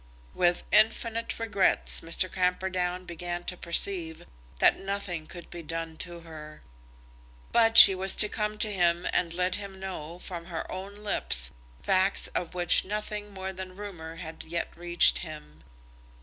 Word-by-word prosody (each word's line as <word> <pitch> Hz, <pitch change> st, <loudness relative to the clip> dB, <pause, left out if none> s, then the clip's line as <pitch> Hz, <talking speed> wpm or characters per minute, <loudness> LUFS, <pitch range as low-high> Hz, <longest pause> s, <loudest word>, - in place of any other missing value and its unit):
With 175 Hz, 0 st, +1 dB
infinite 225 Hz, +1 st, +2 dB
regrets, 210 Hz, -4 st, +2 dB
Mr. 165 Hz, +3 st, 0 dB
Camperdown 180 Hz, 0 st, -1 dB
began 175 Hz, 0 st, -6 dB
to 180 Hz, -, -6 dB
perceive 170 Hz, -1 st, 0 dB, 0.3 s
that -, -, +4 dB
nothing 195 Hz, -5 st, -5 dB
could 175 Hz, -1 st, -11 dB
be 175 Hz, -, -8 dB
done 165 Hz, 0 st, -6 dB
to 175 Hz, 0 st, -4 dB
her. 155 Hz, -2 st, -12 dB, 0.9 s
But 225 Hz, -1 st, +3 dB
she 195 Hz, -, +12 dB
was 190 Hz, 0 st, +1 dB
to 210 Hz, -, +5 dB
come 210 Hz, 0 st, -3 dB
to 215 Hz, -, -4 dB
him 175 Hz, -2 st, +1 dB
and 170 Hz, -, 0 dB
let 180 Hz, +2 st, -1 dB
him 195 Hz, -1 st, -10 dB
know, 175 Hz, -4 st, -7 dB
from 175 Hz, -2 st, -8 dB
her 165 Hz, -3 st, -5 dB
own 195 Hz, +2 st, -7 dB
lips, 200 Hz, -, +2 dB, 0.3 s
facts 190 Hz, +1 st, +1 dB
of 175 Hz, 0 st, -5 dB
which 175 Hz, -1 st, +4 dB
nothing 210 Hz, +1 st, -5 dB
more 190 Hz, -1 st, -6 dB
than 185 Hz, 0 st, -9 dB
rumour 175 Hz, -5 st, -9 dB
had 165 Hz, -2 st, -9 dB
yet 170 Hz, +1 st, -5 dB
reached 175 Hz, 0 st, +4 dB
him. 150 Hz, -, -10 dB
180 Hz, 150 wpm, -27 LUFS, 170-195 Hz, 0.9 s, she